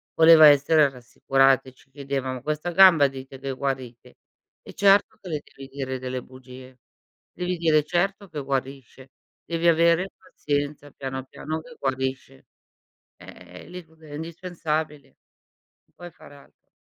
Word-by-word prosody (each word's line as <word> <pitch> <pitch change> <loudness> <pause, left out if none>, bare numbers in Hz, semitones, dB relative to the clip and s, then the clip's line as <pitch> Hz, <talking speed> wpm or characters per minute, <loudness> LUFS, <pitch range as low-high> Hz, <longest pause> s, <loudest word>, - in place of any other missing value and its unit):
voleva 160 -1 +8
essere 145 +1 +4
rassicurata 135 +1 +1
e 130 - -19
ci 135 - -26
chiedeva: 135 -2 -4
"Ma 125 - -7
questa 155 +4 -3
gamba 170 -6 +6
dite 135 0 -10
che 135 0 -5
guarite?" 130 -2 -5 0.4
E - - -13
certo 200 0 +3
che 185 - -10
le 150 -2 -3
devi 135 0 -11
dire 135 -1 -5
delle 130 0 -5
bugie. 130 0 -14 0.5
Devi 180 0 -4
dire: 160 -2 +2
"Certo 195 +5 -2
che 150 -3 -6
guarisce. 135 -1 -5 0.3
Devi 170 0 -1
avere 170 +3 +3
pazienza 145 0 -4
piano, 130 -1 -6
piano 155 +4 -6
che 245 +5 -15
guarisce." 130 0 -4 0.7
Eh - - -14
lì 180 0 -9
proprio 160 -1 -19
è - - -10
indispensabile. 160 -3 -4 0.8
Non - - -40
puoi 175 0 -10
fare 145 - -16
altro. 140 - -23
145 Hz, 145 wpm, -24 LUFS, 130-165 Hz, 0.8 s, voleva